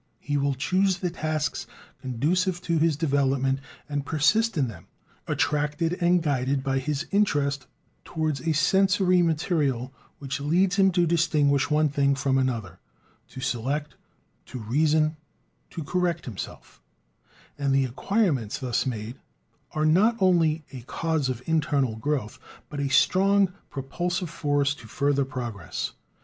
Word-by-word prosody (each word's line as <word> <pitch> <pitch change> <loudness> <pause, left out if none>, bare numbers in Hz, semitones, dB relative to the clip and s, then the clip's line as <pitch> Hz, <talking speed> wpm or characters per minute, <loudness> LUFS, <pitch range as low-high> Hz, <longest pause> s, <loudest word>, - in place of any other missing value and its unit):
He 145 - -3
will 140 -1 +1
choose 185 +7 +1
the 180 -2 -2
tasks 155 -3 -2 0.3
conducive 170 +9 0
to 165 -2 +1
his 160 -2 +2
development 135 -3 +1 0.3
and 145 -1 -2
persist 190 +10 +2
in 135 -3 +2
them, 90 -8 -10 0.4
attracted 150 +3 0
and 175 0 +3
guided 135 -2 0
by 135 -1 0
his 150 +3 -2
interest 145 -10 +1 0.4
towards 155 -4 -2
a 165 - 0
sensory 190 +3 +3
material 150 -6 0 0.2
which 140 -1 -4
leads 180 +7 +2
him 195 -1 +5
to 175 -1 +3
distinguish 155 -4 +2
one 155 0 +3
thing 140 -1 +2
from 135 0 +1
another, 115 -9 -2 0.5
to 130 - -9
select, 135 +3 -2 0.5
to - - -7
reason, 155 +7 +1 0.5
to 165 - -6
correct 170 +1 -1
himself; 115 -8 -8 0.8
and 140 -1 +1
the 135 0 +3
acquirements 140 - 0
thus 130 -2 -1
made 115 0 -4 0.6
are 155 0 0
not 200 +9 +4
only 165 -5 +3
"a 130 - -7
cause 155 +2 -1
of 125 -1 -4
internal 145 -7 +1
growth" 125 -2 -2 0.3
but 145 - -6
a 140 -1 -1
strong 195 +6 +3 0.2
propulsive 175 +6 -3
force 145 -3 +1
to 120 -6 -13
further 140 +2 +1
progress. 120 -9 -5
145 Hz, 135 wpm, -26 LUFS, 135-170 Hz, 0.8 s, him